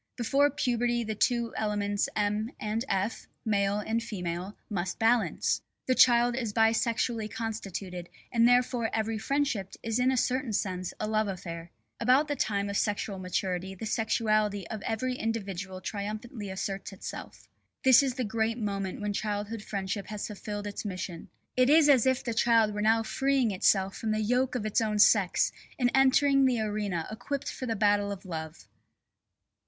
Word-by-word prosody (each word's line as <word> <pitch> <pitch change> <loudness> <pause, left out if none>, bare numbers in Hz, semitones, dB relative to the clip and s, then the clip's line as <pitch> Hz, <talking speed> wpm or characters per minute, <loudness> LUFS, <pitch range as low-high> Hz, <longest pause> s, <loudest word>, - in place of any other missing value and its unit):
Before 275 +4 +3
puberty 240 -3 0
the 220 -1 -3
two 235 +2 0
elements 205 -1 0
M. 210 +1 0
and 215 +2 -2
F., 195 +5 -1 0.2
male 200 -2 +1
and 220 +2 -1
female, 185 -3 -5
must 185 -3 -3
balance. 230 +1 +2 0.2
The 255 - +2
child 240 -1 +5
is 230 -5 -3
bisexually 225 0 +1
constituted, 195 -6 -5 0.2
and 235 -1 +4
therefore 245 -2 +2
every 220 0 -1
friendship 270 -6 -1
is 225 +1 -1
in 255 +1 +3
a 260 - 0
certain 255 -1 0
sense 185 -3 -2
a 215 - -2
love 215 0 +1
affair. 170 -3 -6 0.3
About 260 +5 +4
the 290 - -1
time 200 -5 0
of 200 0 -2
sexual 205 -2 -1
maturity 185 0 -2
the 205 - -6
sexuality 215 -3 0
of 220 -2 -5
every 245 +3 -1
individual 195 -5 -3
triumphantly 210 +2 -5
asserts 195 +1 -4
itself. 195 - -9 0.4
This 260 -1 +7
is 265 -3 -1
the 255 - -1
great 225 +1 -1
moment 200 -3 -3
when 210 0 -1
childhood 210 +1 -3
friendship 195 -1 -4
has 210 0 -4
fulfilled 205 0 -6
its 205 -1 -5
mission. 185 -4 -5 0.3
It 255 +1 +4
is 310 0 +6
as 265 -4 +5
if 260 -1 +2
the 235 - -2
child 225 -2 +3
were 210 - -3
now 225 +1 +3
freeing 265 0 +1
itself 195 0 +2
from 225 - -3
the 215 - 0
yoke 250 +4 +1
of 225 -4 -2
its 215 +1 +1
own 215 -1 0
sex 205 -3 +4 0.3
and 245 -2 +2
entering 270 +1 +5
the 250 -3 +2
arena 205 -6 -2
equipped 275 +5 -4
for 255 - -6
the 225 - -1
battle 205 -1 +2
of 200 -1 -7
love. 160 -2 -7
215 Hz, 170 wpm, -29 LUFS, 200-240 Hz, 0.4 s, This